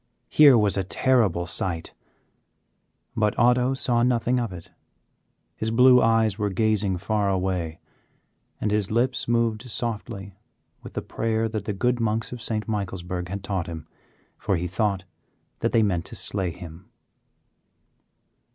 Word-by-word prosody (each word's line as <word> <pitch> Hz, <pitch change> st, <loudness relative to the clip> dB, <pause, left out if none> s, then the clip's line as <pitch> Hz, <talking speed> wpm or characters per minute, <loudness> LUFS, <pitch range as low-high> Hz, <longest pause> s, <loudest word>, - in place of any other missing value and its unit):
Here 145 Hz, -5 st, +7 dB
was 100 Hz, -2 st, +2 dB
a 95 Hz, -, +1 dB
terrible 100 Hz, -4 st, +2 dB
sight, 85 Hz, -1 st, -3 dB, 1.2 s
but 105 Hz, -2 st, +1 dB
Otto 125 Hz, +2 st, +3 dB
saw 120 Hz, -2 st, +1 dB
nothing 125 Hz, 0 st, +2 dB
of 115 Hz, -4 st, -2 dB
it; 85 Hz, -2 st, -10 dB, 0.8 s
his 110 Hz, -, -2 dB
blue 125 Hz, +2 st, +6 dB
eyes 115 Hz, -3 st, +2 dB
were 105 Hz, -1 st, 0 dB
gazing 105 Hz, -1 st, +1 dB
far 100 Hz, +2 st, 0 dB
away, 90 Hz, -4 st, -2 dB, 0.8 s
and 105 Hz, -, -1 dB
his 105 Hz, -2 st, +1 dB
lips 120 Hz, +3 st, 0 dB
moved 115 Hz, 0 st, 0 dB
softly 110 Hz, -4 st, -4 dB, 0.5 s
with -, -, -11 dB
the -, -, -4 dB
prayer 115 Hz, 0 st, -1 dB
that 110 Hz, -2 st, -4 dB
the 105 Hz, -, -2 dB
good 120 Hz, +5 st, 0 dB
monks 110 Hz, 0 st, -1 dB
of 125 Hz, -1 st, -7 dB
St. 110 Hz, -2 st, -3 dB
Michaelsburg 95 Hz, -4 st, -3 dB
had 100 Hz, +1 st, -5 dB
taught 95 Hz, -4 st, -2 dB
him, 80 Hz, -2 st, -7 dB, 0.5 s
for 100 Hz, -, 0 dB
he 85 Hz, +1 st, -2 dB
thought 95 Hz, +1 st, -1 dB, 0.6 s
that -, -, 0 dB
they 115 Hz, -, +4 dB
meant 90 Hz, -5 st, 0 dB
to -, -, -9 dB
slay 95 Hz, -3 st, -1 dB
him. 85 Hz, +2 st, -11 dB
105 Hz, 145 wpm, -25 LUFS, 95-115 Hz, 1.2 s, Here